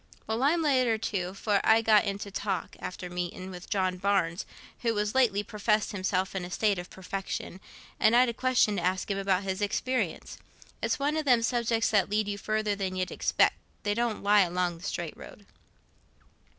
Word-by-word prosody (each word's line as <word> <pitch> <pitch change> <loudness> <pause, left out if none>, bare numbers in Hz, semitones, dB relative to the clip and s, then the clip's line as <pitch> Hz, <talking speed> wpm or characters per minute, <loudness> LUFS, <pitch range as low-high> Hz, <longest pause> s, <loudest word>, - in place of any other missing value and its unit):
"Well, 220 +2 -2
I'm 320 +5 +3
later 255 -6 +3
too, 190 -4 -3
for 200 0 +1
I 225 +1 +5
got 215 -1 +5
into 200 0 -4
talk, 195 -2 -3
after 185 0 -6
meeting, 180 +1 -5
with 180 -1 -10
John 185 -3 0
Barnes, 185 -2 0 0.3
who 230 -2 0
has 210 0 -1
lately 225 -6 +3
professed 210 0 0
himself 190 -1 -1
in 190 -2 -3
a 180 - -6
state 200 +1 +1
of 175 - -8
perfection, 190 0 -5 0.4
and 220 - +5
I'd 250 +1 +6
a 235 - -1
question 240 -4 +2
to - - -1
ask 185 +3 -1
him 195 - -1
about 195 -1 +1
his 190 +1 -3
experience. 255 +5 -2 0.4
It's - - 0
one 290 +2 0
o' - - +2
them 250 -6 +3
subjects 230 -2 +1
that 205 -3 +3
lead 210 0 +1
you 205 0 -3
further 215 0 -1
than 190 -2 -3
y' 185 - -1
expect—they 205 +2 0
don't 235 -1 -1
lie 205 0 +5
along 175 -1 0
the - - -15
straight - - -4
road." - - -13
205 Hz, 190 wpm, -28 LUFS, 185-225 Hz, 0.4 s, I'd